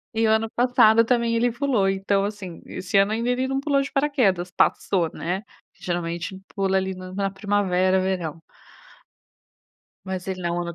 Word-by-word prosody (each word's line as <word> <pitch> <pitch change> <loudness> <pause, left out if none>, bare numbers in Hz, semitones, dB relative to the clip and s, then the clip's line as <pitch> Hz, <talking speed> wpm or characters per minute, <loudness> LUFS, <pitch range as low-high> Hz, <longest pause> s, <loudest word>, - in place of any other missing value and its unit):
E 225 0 +2
o - - +3
ano 220 0 +2
passado 230 -2 +5
também 235 -1 +1
ele 240 +1 +2
pulou. 240 -6 +1
Então, 195 +1 0
assim, 200 -4 -6
esse 185 +2 -2
ano 200 +2 +4
ainda 235 +2 -1
ele 255 +1 0
não 270 0 -1
pulou 280 -1 +1
de 275 - -5
paraquedas. 230 -12 +1
Passou, 175 -1 +1
né. 180 +4 -3 0.3
Que - - -23
geralmente 175 +1 -3 0.2
pula 195 -1 +1
ali 190 0 -1
no 185 0 -9
na 195 -1 -1
primavera, 190 -2 +1
verão. 175 -4 -2 1.6
Mas, 190 -1 -5
ele 185 -1 -4
não 175 0 -1
195 Hz, 170 wpm, -24 LUFS, 185-230 Hz, 1.6 s, passado